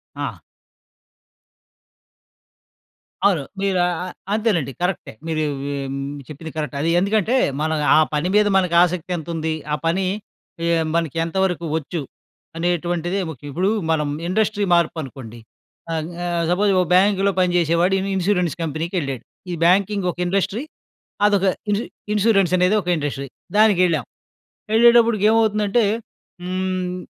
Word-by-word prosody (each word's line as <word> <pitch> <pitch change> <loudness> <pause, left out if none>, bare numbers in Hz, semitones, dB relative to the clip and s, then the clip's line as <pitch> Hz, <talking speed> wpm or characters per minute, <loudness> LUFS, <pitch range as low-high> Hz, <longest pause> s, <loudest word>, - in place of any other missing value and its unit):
ఆ! - - -5 2.8
అవును. 190 -7 +3 0.2
మీరు 195 -2 +1
ఆ! - - +1
ఆ! - - -4 0.3
అంతేనండి. 205 - 0
కరెక్టే. 180 -7 -2
మీరు 155 -1 -1 0.2
హ్మ్ 140 -1 -4 0.3
చెప్పింది 155 +2 -8
కరెక్ట్. 150 -3 -3
అది 165 - +1
ఎందుకంటే 215 +4 +1 0.3
మనం 160 0 0 0.2
ఆ - - +6 0.2
పని 150 +4 0
మీద 210 0 +5
మనకు 180 -3 +1
ఆసక్తి 180 0 -2
ఎంత 160 0 -8
ఉంది? 160 0 -1 0.2
ఆ - - +3
పని 185 +3 +1 0.6
ఆహ్, 165 -1 +2
మనకి 165 -2 -1
ఎంతవరకు 180 -1 -1
వచ్చు? 160 +2 -4 0.6
అనేటువంటిది 175 +2 -1
ముఖ్యం. 145 -1 -9
ఇప్పుడు 180 +7 0 0.2
మనం 150 -2 +1 0.2
ఇండస్ట్రీ 210 +2 0
మార్పు 170 -1 +2
అనుకోండి. 125 -5 -9 0.6
అంగ్ 160 +2 -3
ఆహ్, 170 -1 0
సపోజ్, 200 +3 +2
ఒక 180 - +2
బ్యాంకులో 195 +1 +3
పని 180 -1 +3
జేసేవాడు 170 +3 +2
ఇన్ 195 +1 -3
ఇన్సూరెన్స్ 180 -4 +1
కంపెనీకేళ్ళాడు. 155 - -3 0.3
ఈ - - -2
బ్యాంకింగ్ 195 +2 +3
ఒక - - -16
ఇండస్ట్రీ. 195 +6 -1 0.6
అదొక 200 -2 +2 0.2
ఇన్సు 205 +3 0 0.3
ఇన్సూరెన్స్ 195 -4 +3
అనేది 180 +4 +3
ఒక 180 - -8
ఇండస్ట్రీ. 145 -2 -3 0.3
దానికేళ్ళాం. 180 - +4 0.7
ఎళ్ళేటప్పటికి 235 -2 +5
ఏమవుతుందంటే, 220 0 +2 0.6
హ్మ్. 185 0 -2
180 Hz, 130 wpm, -21 LUFS, 160-200 Hz, 2.8 s, ఆ